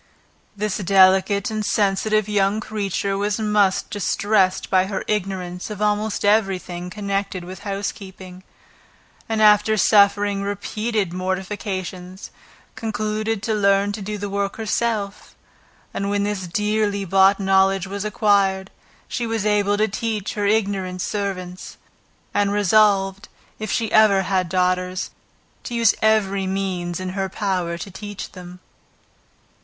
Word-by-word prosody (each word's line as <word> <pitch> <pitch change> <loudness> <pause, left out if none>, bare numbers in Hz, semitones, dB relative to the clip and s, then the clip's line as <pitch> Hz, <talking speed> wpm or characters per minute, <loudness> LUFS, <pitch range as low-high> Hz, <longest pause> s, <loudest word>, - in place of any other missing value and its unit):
This 210 0 -2
delicate 190 +2 +4
and 215 -1 -2
sensitive 210 +1 +1
young 205 0 +1
creature 200 -2 -2
was 205 +1 0
much 210 -3 +2
distressed 200 -1 +1
by 185 0 +3
her 195 -1 -3
ignorance 185 -2 -3
of 210 -2 -6
almost 210 0 0
every 205 -2 +3
thing 180 0 -7
connected 200 -2 -3
with 185 +1 -9
housekeeping; 195 -2 -6 0.9
and 220 -1 +1
after 210 +1 +5
suffering 200 -1 +4
repeated 205 -1 -2
mortifications, 185 0 -4 0.4
concluded 215 -1 -2
to 225 - 0
learn 200 -1 +2
to 205 +1 -6
do 210 +2 -4
the 205 0 -4
work 200 0 -2
herself; 220 -2 -2 0.6
and 200 - -2
when 200 0 0
this 200 -3 -3
dearly 210 +1 0
bought 195 +2 +4
knowledge 195 -1 +3
was 200 +1 -5
acquired, 200 -3 +1 0.4
she 240 -2 -3
was 225 -2 -2
able 205 -1 +2
to 215 +1 +2
teach 215 -1 -3
her 205 -1 -1
ignorant 195 -4 0
servants; 185 -2 -4 0.6
and 205 -1 +2
resolved, 200 -1 +2 0.3
if 215 -1 -1
ever 205 -3 +5
she - - -7
had 185 -3 0
daughters, 185 0 0 0.5
to 240 - -5
use 230 -2 +4
every 200 -3 +2
means 185 -3 -2
in 185 0 -4
her 190 0 -3
power 185 -4 -2
to 190 +4 -8
teach 205 0 -7
them. 180 -1 -11
200 Hz, 130 wpm, -22 LUFS, 190-210 Hz, 0.9 s, after